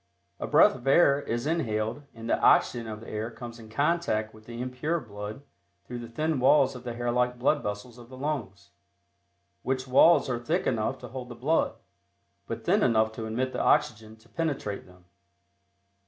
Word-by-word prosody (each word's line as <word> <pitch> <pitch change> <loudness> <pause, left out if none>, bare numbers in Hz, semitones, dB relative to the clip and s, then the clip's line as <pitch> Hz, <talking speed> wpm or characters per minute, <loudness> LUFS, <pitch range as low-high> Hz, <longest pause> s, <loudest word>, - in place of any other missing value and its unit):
A - - -3
breath - - +6
of 130 +1 -10
air 140 -1 +5
is 120 -1 -3
inhaled 115 -6 -1
and 115 0 -8
the - - +1
oxygen 115 -2 +3
of 110 -1 -6
the 115 - -11
air 110 +1 -3
comes 120 0 -9
in 110 -1 -12
contact 140 -5 0
with 110 0 -16
the 120 0 -7
impure 130 +7 -2
blood 105 0 -8 0.4
through 120 -1 -6
the 120 - -7
thin 155 +4 -1
walls 135 +1 +4
of 125 - -9
the 120 -2 -5
hair 120 0 -1
like 125 0 +1
blood 145 +4 +2
vessels 105 +4 -6
of 120 0 -13
the 130 - -11
lungs, 130 -9 -4 0.9
which 130 0 -2
walls 160 +6 +6
are 125 -2 -1
thick 170 +9 -1
enough 115 +2 0
to 125 - -8
hold 125 0 -7
the 120 - -8
blood, 140 +8 +1 0.7
but - - -6
thin - - +3
enough 110 -2 +3
to 110 0 -6
admit 130 +4 -2
the - - -1
oxygen 110 -7 +1
to 110 +1 -23
penetrate 140 - -3
them. 90 -1 -19
120 Hz, 190 wpm, -28 LUFS, 110-135 Hz, 0.9 s, breath